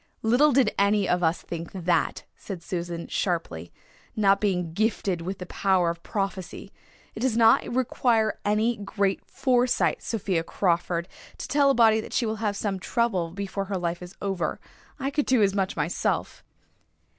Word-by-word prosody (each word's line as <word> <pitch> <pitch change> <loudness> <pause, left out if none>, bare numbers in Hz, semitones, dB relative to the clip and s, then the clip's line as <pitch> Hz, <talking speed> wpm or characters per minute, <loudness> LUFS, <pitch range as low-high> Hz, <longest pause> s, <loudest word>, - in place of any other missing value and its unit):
"Little 250 +7 +4
did 265 -1 +3
any 200 0 +3
of 180 0 +1
us 165 0 +1
think 170 -1 -6
that," 175 -3 0
said 185 -5 -8
Susan 170 -1 -4
sharply, 125 - -2 0.4
"not 200 -2 +3
being 180 -5 0
gifted 200 -3 0
with 185 +3 -4
the 180 - -7
power 185 -2 +1
of 170 0 -9
prophecy. 195 -2 -4 0.4
It - - -8
does 240 -1 0
not 225 -1 +5
require 235 -3 +1
any 215 +3 +1
great 200 -1 -1
foresight, 250 -2 +1
Sophia 190 -7 -1
Crawford, 170 -1 0 0.3
to - - -6
tell 285 -1 +3
a 275 - +3
body 220 -2 +5
that - - -10
she 240 - +1
will 220 0 -2
have 210 -2 -1
some 200 -3 -2
trouble 190 -4 0
before 195 +2 -4
her 195 0 -3
life 175 0 -3
is 180 +1 -10
over. 190 -6 -2 0.4
I 275 0 -2
could 295 0 0
do 250 -5 +4
as 195 -1 +2
much 195 -1 -1
myself." - - -1
195 Hz, 170 wpm, -26 LUFS, 175-225 Hz, 0.4 s, not